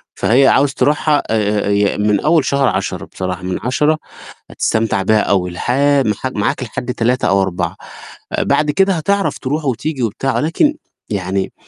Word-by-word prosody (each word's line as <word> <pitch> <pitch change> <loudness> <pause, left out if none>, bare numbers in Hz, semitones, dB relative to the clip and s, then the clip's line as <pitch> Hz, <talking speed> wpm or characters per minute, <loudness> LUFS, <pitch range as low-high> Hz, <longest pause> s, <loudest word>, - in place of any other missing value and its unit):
فهي 130 +4 +3
عاوز 140 0 +3
تروحها 145 +2 +1
آآ، 105 -2 0
ي 100 0 +1
من 105 -1 +2
أول 155 - +2
شهر 140 -1 +2
10 95 0 -2
بصراحة 90 0 -5
من 90 0 -3
10 150 +5 +1 0.5
هتستمتع 110 -3 0
بيها 110 +2 +3
أوي 95 -3 0
لح 90 +7 -3 0.3
مح 105 +3 -2
معاك 105 +5 -1
لحد 125 +1 -4
3 120 +2 0
أو 95 +1 +3
4، 95 -2 -2 0.6
بعد 150 0 +1
كده 195 +4 +2
هتعرف 195 +4 0
تروح 150 +4 -3
وتيجي 135 +1 -2
وبتاع، 120 +3 -1
ولكن 170 - +1 0.4
يعني 95 -1 -2
120 Hz, 155 wpm, -17 LUFS, 100-145 Hz, 0.6 s, فهي